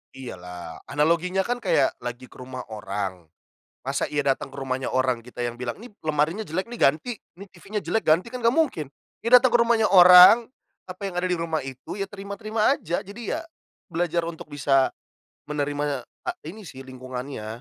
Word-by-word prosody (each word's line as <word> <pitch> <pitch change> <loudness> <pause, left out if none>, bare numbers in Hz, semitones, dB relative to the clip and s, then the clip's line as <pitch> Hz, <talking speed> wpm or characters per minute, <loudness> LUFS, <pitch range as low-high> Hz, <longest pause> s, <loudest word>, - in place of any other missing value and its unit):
Iya, 125 -9 -8
lah. 90 -2 -9
Analoginya 170 +5 +1
kan 245 +3 -2
kayak - - +2
lagi 120 +1 -6
ke - - -15
rumah 125 0 -7
orang, 95 -4 -5 0.6
masa - - -1
iya 145 -1 -1
datang 135 -1 0
ke 140 - -14
rumahnya 130 -1 -3
orang, 130 -2 +1
kita 120 +1 -7
yang 120 0 -4
bilang, 120 -1 -3
"Nih, 245 - -11
lemarinya 155 +7 -1
jelek 185 +7 -3
nih, 240 - -7
ganti. 155 - +2 0.2
Nih 200 +2 -11
TV-nya 200 +4 -6
jelek, 225 - 0
ganti". 175 +9 +3
Kan 250 - -5
gak 230 +1 +2
mungkin. 260 - +1 0.3
Ya 230 +3 +5
datang 255 0 +2
ke 240 - +4
rumahnya 230 -2 +3
orang, 180 +5 +9 0.4
apa 185 +2 -10
yang 180 - -7
ada 185 - 0
di 180 - +1
rumah 165 -2 -2
itu, 135 +9 -8
ya 195 - -2
terima-terima 210 +5 -1
aja. 170 - -3
Jadi 215 +7 -5
ya, 330 - -5 0.5
belajar 170 0 0
untuk 165 -2 -8
bisa 140 -2 +2 0.6
menerima 145 -2 -2 0.2
a - - -1 0.2
ini 210 +6 -9
sih, 135 -6 -10
lingkungannya. 130 -2 -7
155 Hz, 185 wpm, -25 LUFS, 130-200 Hz, 0.6 s, orang